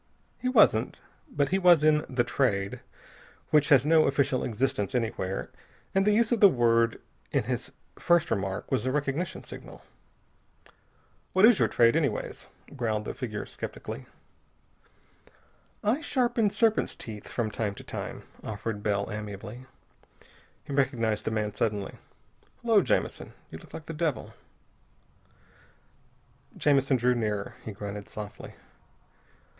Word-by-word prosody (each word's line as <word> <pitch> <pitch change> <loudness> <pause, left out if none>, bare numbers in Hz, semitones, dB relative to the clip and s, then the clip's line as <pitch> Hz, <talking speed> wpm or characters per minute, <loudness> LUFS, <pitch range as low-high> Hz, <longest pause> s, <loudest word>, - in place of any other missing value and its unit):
He 255 - -1
wasn't. 210 - +4 0.3
But 145 -1 0
he 190 - +1
was 175 -4 +6
in 155 -1 +4
the 130 -2 +1
Trade 100 -6 0 0.7
which 150 -1 +4
has 140 -2 +6
no 160 0 +5
official 135 -2 +1
existence 125 -1 -1
anywhere. 110 -5 -2 0.4
And 195 +1 +2
the - - +6
use 225 +2 +3
of 235 - +2
the 200 - +9
word 115 -4 +2 0.3
in - - +1
his - - -3 0.3
first 175 -2 +3
remark 95 -2 -2
was - - +1
a - - +1
recognition 150 +5 -2
signal. - - -11 1.5
"What 190 +3 +6
is 235 -2 +6
your - - +4
trade, 115 -1 +4
anyways?" - - -1 0.3
growled 110 -5 -1
the - - -4
figure 110 -5 -5
skeptically. - - -7 1.8
"I 235 +9 +1
sharpen 240 -7 +1
serpents' 220 +1 +1
teeth 105 -3 -8
from 115 -3 -2
time 105 -2 -2
to - - -9
time," - - -6 0.2
offered 105 0 -4
Bell 100 -1 0
amiably. 105 +4 -7 1.0
He 140 - -7
recognized 120 -6 0
the - - +1
man, 105 -2 -1
suddenly. 105 -2 -2 0.6
"Hullo, 225 -3 +5
Jamison, - - -1 0.2
you 80 - -8
look - - -16
like 160 - -8
the 165 - -6
devil." 150 -7 -2 2.2
Jamison 135 -2 +3
drew 125 +1 +3
nearer. 105 -4 -2
He 110 - -6
grunted 100 0 -7
softly. 105 -1 -8
125 Hz, 135 wpm, -28 LUFS, 105-160 Hz, 2.2 s, the